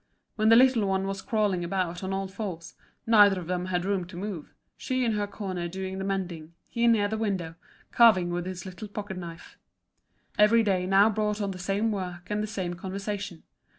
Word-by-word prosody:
When 215 0 +3
the 225 - +8
little 245 -4 +5
one 190 0 0
was 195 0 -3
crawling 210 -7 0
about 175 0 -2
on 190 - -3
all 195 0 -2
fours, 190 -4 -6 0.3
neither 205 -4 +6
of 175 - -7
them 180 +1 -2
had 180 -1 -1
room 195 -2 0
to 175 0 -11
move, 185 -5 -5 0.2
she 255 -1 -1
in 230 - +2
her 205 -1 -1
corner 185 -4 -4
doing 190 +2 -5
the - - -3
mending, 175 -4 -4 0.2
he 235 0 +2
near 220 -3 +4
the 220 +1 -3
window, 190 -7 -2 0.4
carving 200 -7 +5
with 175 +1 -3
his 185 -1 -6
little 190 +3 -8
pocket 205 -2 -6
knife. 170 -2 -9 0.8
Every 225 +2 +6
day 185 -3 +1
now 195 +3 +5
brought 210 0 -1
on 200 -2 -1
the 185 - -8
same 200 +4 0
work 180 -2 -5
and 210 0 0
the 215 - -2
same 190 -5 -3
conversation. 195 0 -5
195 Hz, 200 wpm, -27 LUFS, 180-210 Hz, 0.8 s, the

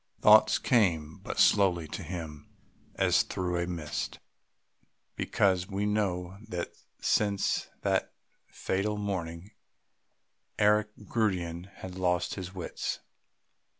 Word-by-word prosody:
Thoughts - - +7
came 85 -10 +1
but - - -6
slowly 90 -5 +4
to - - -5
him 80 -5 -7 0.5
as - - +4
through 90 -1 -2
a 85 - -1
mist, 85 -4 -4 1.0
because 95 -2 +1
we 100 +1 -1
know 95 -3 -1
that 90 -5 -4 0.3
since 100 -2 +1
that - - +1 0.4
fatal 105 +3 -2
morning 95 -2 -4 1.1
Eric 105 0 +4 0.2
Gundian 90 -6 -1
had 95 - -8
lost 90 -1 +1
his 95 -1 -6
wits. 90 -3 -4
95 Hz, 105 wpm, -29 LUFS, 85-100 Hz, 1.1 s, Thoughts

